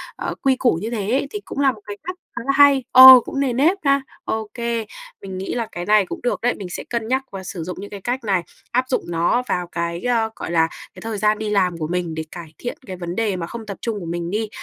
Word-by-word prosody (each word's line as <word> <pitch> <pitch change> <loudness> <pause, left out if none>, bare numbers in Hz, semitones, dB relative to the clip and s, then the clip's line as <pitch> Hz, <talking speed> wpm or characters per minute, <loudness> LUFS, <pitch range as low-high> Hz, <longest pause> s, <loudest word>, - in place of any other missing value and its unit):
ờ, - - -4
quy 270 -1 +3
củ 250 -5 +2
như 220 - -3
thế 215 -2 -2
ấy 275 +2 +1
thì 420 - -5
cũng - - -6
là 275 -1 +4
một 215 -4 -13
cái 205 0 -7
cách 365 +3 -5 0.2
khá - - -3
là 275 - +2
hay, 285 -2 +6
ờ, 260 0 +12
cũng 275 - -4
nề 270 -3 +1
nếp 310 +10 +3
ha. 275 -1 +3 0.2
Ô 220 -1 -3
kê, 235 -2 -2 0.4
mình 190 -1 -7
nghĩ 190 - -4
là 235 -2 -1
cái 175 0 -5
này 210 -1 +4
cũng - - -6
được 245 - -1
đấy. 245 +1 +2
Mình 195 -3 -7
sẽ - - -5
cân 235 -2 -2
nhắc 260 +2 +1
và 195 -1 -7
sử 175 -2 -6
dụng 180 +2 -6
những 200 +1 -7
cái 200 -1 -8
cách 245 +4 -2
này, 190 -5 +1 0.3
áp 255 +2 +2
dụng 255 - 0
nó 175 +8 +1
vào 180 -1 -1
cái, 170 0 -3
ơ, 230 -3 +1
gọi - - -6
là, 165 -1 +3 0.3
cái - - -12
thời 225 -1 -4
gian 210 +1 +2
đi 215 -1 -3
làm 185 -4 +1
của 155 -2 -3
mình 175 -2 -2
để 160 - -3
cải 165 -3 -9
thiện 245 - -5
cái 190 - -6
vấn 175 -1 -5
đề 215 -3 0
mà 170 -2 -4
không 230 -1 -7
tập 200 -2 -6
trung 225 -3 -2
của 175 - -7
mình 170 0 -3
đi. 215 +1 -1
215 Hz, 285 wpm, -21 LUFS, 180-245 Hz, 0.4 s, ờ